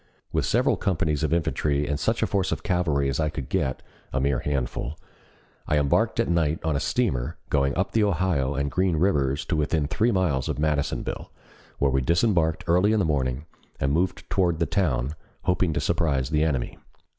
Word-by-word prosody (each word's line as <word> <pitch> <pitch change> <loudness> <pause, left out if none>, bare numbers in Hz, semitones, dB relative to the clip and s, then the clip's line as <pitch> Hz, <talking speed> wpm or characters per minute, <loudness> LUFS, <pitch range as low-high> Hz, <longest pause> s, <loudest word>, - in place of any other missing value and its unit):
With - - 0
several - - +2
companies 80 -5 0
of 80 -2 0
infantry 75 -3 0
and 75 -1 -1
such - - 0
force 95 -3 0
of 80 -1 -3
cavalry 85 -8 +1
as 70 +1 -1
I 80 -1 +1
could 70 -4 -6
get 65 -1 -1 0.3
(a 65 - 0
mere 70 -1 +1
handful), 70 +1 -3 0.7
I 75 - +2
embarked 90 +12 +1
at 115 - +2
night 80 -2 +1
on 80 -2 0
a - - +1
steamer, 80 - -1
going 70 0 +1
up 95 - 0
the 110 - +2
Ohio 85 -8 +1
and 70 0 -1
Green 90 -2 +1
Rivers 75 -5 +1
to 90 - -1
within 75 0 +1
three 110 +11 +1
miles 80 - 0
of 75 - -2
Madisonville, 75 -1 -2 0.5
where 70 -1 +2
we 65 0 +2
disembarked 85 - +2
early 90 +5 +3
in 110 - +2
the 95 - +2
morning, 70 -2 -1 0.3
and 70 +1 +1
moved 85 +2 -1
toward 90 -4 +1
the 85 - +1
town, 70 -7 0 0.3
hoping 90 -1 +1
to - - 0
surprise 80 -6 0
the 75 0 +2
enemy. 70 -6 -1
75 Hz, 190 wpm, -25 LUFS, 70-90 Hz, 0.7 s, early